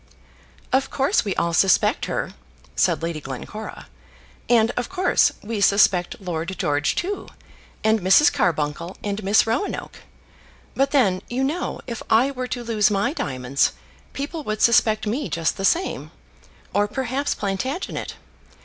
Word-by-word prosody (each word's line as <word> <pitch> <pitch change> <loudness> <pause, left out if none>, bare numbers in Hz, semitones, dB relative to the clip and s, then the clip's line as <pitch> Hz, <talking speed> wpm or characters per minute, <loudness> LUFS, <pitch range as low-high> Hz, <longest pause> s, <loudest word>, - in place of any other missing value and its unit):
"Of 265 +1 +2
course, 275 +9 +1
we 200 -4 -2
all 170 0 0
suspect 210 - +3
her," - - -3 0.4
said 165 -4 +1
Lady 165 -2 -3
Glencora; 145 - -7 0.6
"and, 230 -1 +4
of 245 - -3
course, 370 0 +3
we 215 -1 -3
suspect 195 -3 +3
Lord 175 -1 -4
George 145 -1 0
too, 390 +3 -3 0.6
and 220 0 +3
Mrs. 195 +11 +5
Carbuncle 170 +1 -1
and 205 0 -3
Miss 200 +3 +4
Roanoke. 230 - -3 0.8
But 275 +1 +1
then, 205 -11 +2
you 255 +2 -1
know, 310 +7 -2
if 235 -3 -6
I 245 +5 +4
were 255 -2 -4
to 245 -1 -4
lose 220 -3 +2
my 210 +7 0
diamonds, 130 - 0 0.4
people 300 +3 -5
would 215 0 -1
suspect 220 -2 +4
me 245 +8 -2
just 165 -2 0
the 195 - -1
same, 355 - 0 0.6
or 205 0 +2
perhaps 265 +4 -2
Plantagenet. 255 - -3
215 Hz, 140 wpm, -23 LUFS, 185-265 Hz, 0.8 s, Mrs